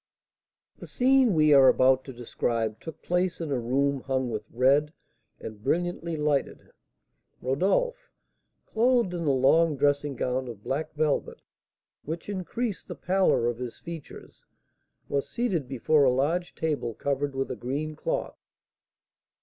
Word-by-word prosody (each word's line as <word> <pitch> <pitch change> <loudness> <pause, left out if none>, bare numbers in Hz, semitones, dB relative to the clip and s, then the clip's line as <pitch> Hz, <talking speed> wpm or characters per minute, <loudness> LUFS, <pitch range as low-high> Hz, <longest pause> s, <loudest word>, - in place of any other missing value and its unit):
The - - -9
scene 255 -4 +3
we 155 -1 +5
are 135 -2 +7
about 130 0 +4
to 135 - -7
describe 115 -2 -2
took 160 -2 -10
place 180 0 0
in 160 -3 -4
a 130 - 0
room 135 +4 0
hung 130 -2 -1
with 105 -1 -5
red, 140 +5 +2 0.5
and 105 -1 -9
brilliantly 170 +2 -1
lighted. 150 -2 -1 0.7
Rodolph, 465 - 0 0.6
clothed 235 -4 +2
in 170 -2 -3
a - - +4
long 145 +4 +3
dressing 145 0 +1
gown 130 +1 -2
of 110 -4 -9
black 150 +4 -3
velvet, 155 -1 -1 0.6
which 165 +5 -6
increased 205 +3 -4
the - - -6
pallor 185 -9 +2
of 120 0 -1
his 125 -2 -6
features, 165 -3 -10 0.6
was 140 -1 -2
seated 195 - -1
before 140 +4 +2
a 130 - +5
large 160 +8 -1
table 145 -8 -2
covered 140 0 -2
with 135 0 -2
a - - -3
green 150 +5 -4
cloth. - - -3
145 Hz, 140 wpm, -27 LUFS, 130-170 Hz, 0.7 s, are